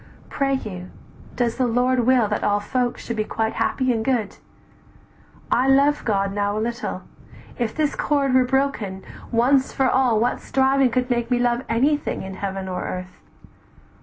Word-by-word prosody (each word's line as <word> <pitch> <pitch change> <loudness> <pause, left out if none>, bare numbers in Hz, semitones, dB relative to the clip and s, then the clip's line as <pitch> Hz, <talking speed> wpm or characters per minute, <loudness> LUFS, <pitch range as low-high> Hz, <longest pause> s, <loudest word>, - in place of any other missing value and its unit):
Pray 275 -1 0
you, 185 -8 -6 0.5
does 235 -2 0
the 255 -1 +1
Lord 245 +1 +1
Will 255 -4 +4
that 210 - -2
all 205 0 +2
folks 245 +3 -2
should 235 - -3
be 215 - +1
quite 220 +1 -2
happy 260 -2 0
and 220 -1 -2
good? 235 -5 -1 1.1
I 255 +2 +3
love 280 +2 +3
God 195 -2 0
now 205 0 -1
a - - 0
little, 235 +2 -3 0.6
if 235 -2 -2
this 305 -2 0
cord 280 -3 +1
"Were 260 0 +5
broken, 250 -7 -1 0.3
once 260 +3 +3
for 265 - +1
all 250 -4 +3
what 240 +2 0
striving 270 0 +2
could 250 +1 -1
Make 240 -1 0
me 245 - +2
love 240 0 +1
anything 280 +3 0
in 190 0 -7
earth 190 - -11 0.2
or 185 -1 -3 0.2
heaven? - - -16
245 Hz, 170 wpm, -22 LUFS, 220-265 Hz, 1.1 s, Were